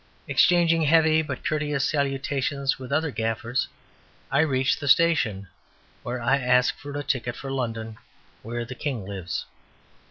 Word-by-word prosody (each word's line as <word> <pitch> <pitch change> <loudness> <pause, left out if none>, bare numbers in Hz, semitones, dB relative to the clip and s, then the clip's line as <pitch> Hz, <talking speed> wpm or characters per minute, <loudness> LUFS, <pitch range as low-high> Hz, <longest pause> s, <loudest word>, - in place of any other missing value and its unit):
Exchanging 170 -2 +4
heavy 160 0 +4
but 140 -5 -6
courteous 150 -2 0
salutations 140 -1 -1
with 130 0 -8
other 155 +1 +1
gaffers, 115 +2 -1 0.6
I 140 - +3
reach 135 -4 +2
the 145 - -5
station, 130 -11 +3 0.5
where 125 +1 -4
I 120 +4 +2
ask 125 -1 +3
for 145 0 -6
a 145 - -3
ticket 125 -3 -2
for 135 - -6
London 115 -4 -4 0.4
where 120 +1 -4
the 125 - -7
king 125 -6 -4
lives. 95 -4 -4
135 Hz, 140 wpm, -25 LUFS, 120-145 Hz, 0.6 s, Exchanging